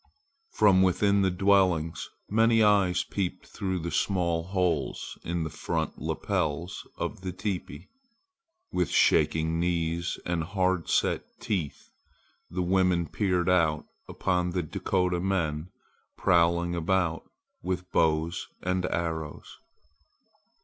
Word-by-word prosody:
From 100 -3 +5
within 100 +2 +3
the 95 - +3
dwellings 90 -5 +2 0.2
many 115 +1 +4
eyes 100 -4 +3
peeped 95 -3 -3
through 95 -2 -3
the 85 0 -4
small 85 -4 0
holes 90 -4 -1
in 85 0 -2
the 80 - -3
front - - -3
lapels 85 +5 -2
of - - -4
the 95 -1 -4
teepee. 95 0 -5 0.8
With - - 0
shaking 80 +1 +3
knees 85 0 -1
and 85 -2 -1
hard 95 -1 0
set - - +1 0.2
teeth, 85 -10 -3 0.6
the 90 +1 -2
women 90 -2 +2
peered 90 -4 0
out 85 -4 +2 0.2
upon 90 -1 0
the 90 0 -1
Dakota 90 +3 0
men 85 -4 -1 0.5
prowling 85 0 +3
about 85 0 0 0.3
with 90 0 -4
bows 80 +1 +1 0.2
and 90 0 0
arrows. 80 -3 -4
90 Hz, 115 wpm, -28 LUFS, 85-95 Hz, 0.8 s, From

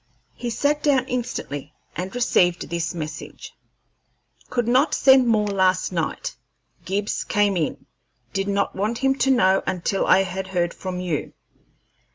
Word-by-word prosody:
He 240 - -5
sat 290 +6 0
down 280 -4 +2
instantly 150 - -4 0.2
and 185 +5 -5
received 180 -8 +2
this 170 0 -3
message: 155 -1 -7 1.0
"Could 240 -2 -1
not 260 +6 +3
send 265 -2 +6
more 215 -2 +3
last 185 -2 +1
night. 165 -3 -3 0.5
Gibbs 200 +3 -1
came 205 -2 +1
in. 155 -5 -2 0.5
Did 195 0 -1
not 200 0 0
want 215 +4 -1
him 270 +1 +2
to 270 - +2
know 190 -7 +4
until 185 +2 -1
I 190 - +5
had 190 0 -5
heard 175 -2 -1
from 185 -1 -5
you. 170 -5 -3
195 Hz, 145 wpm, -23 LUFS, 180-240 Hz, 1.0 s, send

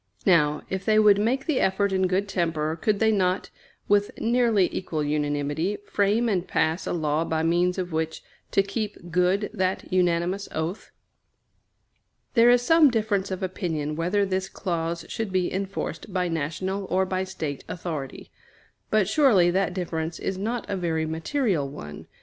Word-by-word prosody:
Now, 150 -5 +3
if 190 0 -3
they 215 0 +3
would 210 -2 +6
make 250 +6 0
the 305 -5 +1
effort 195 +1 +1
in 190 -1 +2
good 190 +2 0
temper, 165 -4 -1
could 205 +5 0
they 220 +1 +3
not, 185 -2 0 0.4
with 205 0 +3
nearly 230 -5 +3
equal 160 -5 -2
unanimity, 145 +5 -1
frame 210 +4 +1
and 190 -5 0
pass 160 +3 0
a - - -1
law 155 -2 0
by 160 -1 -1
means 175 +2 +2
of 180 -1 -3
which 160 0 -2 0.3
to 195 - +3
keep 200 -3 -5
good 180 +4 +1
that 185 -3 -2
unanimous 180 +2 +1
oath? 160 +6 -3 1.4
There 235 0 +6
is 245 0 +5
some 320 +2 +6
difference 215 -5 0
of 190 0 -4
opinion 160 -5 -2
whether 180 +5 +1
this 190 0 -2
clause 170 -2 -3
should 225 -3 -4
be 185 -1 0
enforced 195 +2 -4
by 180 -1 0
national 170 +5 -2
or 190 0 +1
by 185 0 -1
State 160 -7 -5
authority; 160 -6 -6 0.6
but 215 -3 +3
surely 215 - +4
that 190 0 +1
difference 165 -3 -3
is 195 - -3
not 225 +5 -3
a 200 - -2
very 165 -3 -1
material 160 - -1
one. 75 - -9
185 Hz, 160 wpm, -25 LUFS, 165-205 Hz, 1.4 s, would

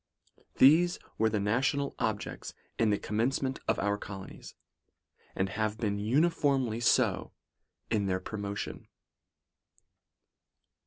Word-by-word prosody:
These 170 +6 +6 0.2
were 110 0 +4
the 110 -1 0
na 105 +4 +1
tional 140 +1 0
objects 110 -2 -3 0.2
in 115 - +3
the 105 - +2
commencement 130 +6 -1
of - - +2
our 100 0 0
colo 95 -2 -7
nies, - - -12 0.8
and 95 0 0
have 110 +1 -2
been 105 -3 -1
uniformly 135 -1 +1
so 120 - +2 0.6
in 105 -3 +1
their 95 -1 0
promo 100 +1 -5
tion. - - -6
110 Hz, 120 wpm, -30 LUFS, 100-135 Hz, 0.8 s, These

